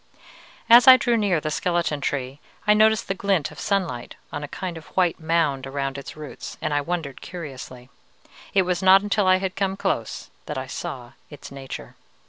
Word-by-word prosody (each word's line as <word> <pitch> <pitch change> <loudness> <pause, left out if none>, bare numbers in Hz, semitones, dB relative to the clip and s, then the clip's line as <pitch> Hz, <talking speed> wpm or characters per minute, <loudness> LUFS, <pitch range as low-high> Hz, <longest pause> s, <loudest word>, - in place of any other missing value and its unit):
"As 240 +1 +8
I 260 0 +11
drew 240 -2 +1
near 200 -7 +2
the 155 0 -3
skeleton 170 -3 -1
tree, 135 0 -3 0.3
I 210 - +6
noticed 220 0 +3
the - - 0
glint 195 -6 0
of 150 - -12
sunlight 180 -12 -2 0.2
on 145 - -4
a - - -4
kind 180 +3 -5
of 160 -1 -10
white 180 -3 +2
mound 160 -5 0
around 135 0 -3
its 140 +2 -8
roots, 150 -2 -8
and - - -2
I 145 - +2
wondered 160 -4 -4
curiously. 135 -7 -8 0.7
It 190 - +5
was 180 -1 -1
not 190 +1 +6
until 205 -1 +1
I 185 - +6
had 185 -1 -3
come 195 -1 -1
close 185 - -3 0.2
that - - -4
I - - -3
saw - - -6 0.2
its - - -11
nature. 135 -1 -8
170 Hz, 190 wpm, -24 LUFS, 140-195 Hz, 0.7 s, I